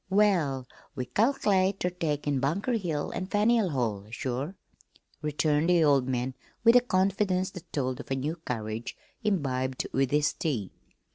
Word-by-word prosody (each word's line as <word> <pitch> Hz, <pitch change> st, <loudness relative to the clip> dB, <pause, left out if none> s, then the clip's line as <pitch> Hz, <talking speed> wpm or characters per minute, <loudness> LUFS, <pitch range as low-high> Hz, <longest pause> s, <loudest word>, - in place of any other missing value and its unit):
"Well, 180 Hz, -10 st, +2 dB, 0.3 s
we 130 Hz, -3 st, -3 dB
cal'late 200 Hz, -, +2 dB
ter 180 Hz, -, 0 dB
take 155 Hz, -5 st, -2 dB
in 145 Hz, -2 st, +1 dB
Bunker 170 Hz, -, 0 dB
Hill 170 Hz, -10 st, -1 dB
an' 185 Hz, -, -3 dB
Faneuil 210 Hz, 0 st, +3 dB
Hall 110 Hz, -8 st, -2 dB
sure," 130 Hz, -, -3 dB, 0.7 s
returned 150 Hz, +1 st, +1 dB
the 175 Hz, -2 st, +5 dB
old 140 Hz, -4 st, +4 dB
man 130 Hz, 0 st, -1 dB, 0.3 s
with 230 Hz, +1 st, +7 dB
a -, -, +10 dB
confidence 190 Hz, -3 st, +1 dB
that 180 Hz, -3 st, -11 dB
told 130 Hz, -3 st, -1 dB
of -, -, -9 dB
new 140 Hz, +5 st, -2 dB
courage 115 Hz, -6 st, -4 dB, 0.3 s
imbibed 130 Hz, -10 st, 0 dB
with 135 Hz, -1 st, +2 dB
his 145 Hz, +1 st, +2 dB
tea. 120 Hz, -, -2 dB
150 Hz, 150 wpm, -28 LUFS, 130-190 Hz, 0.7 s, a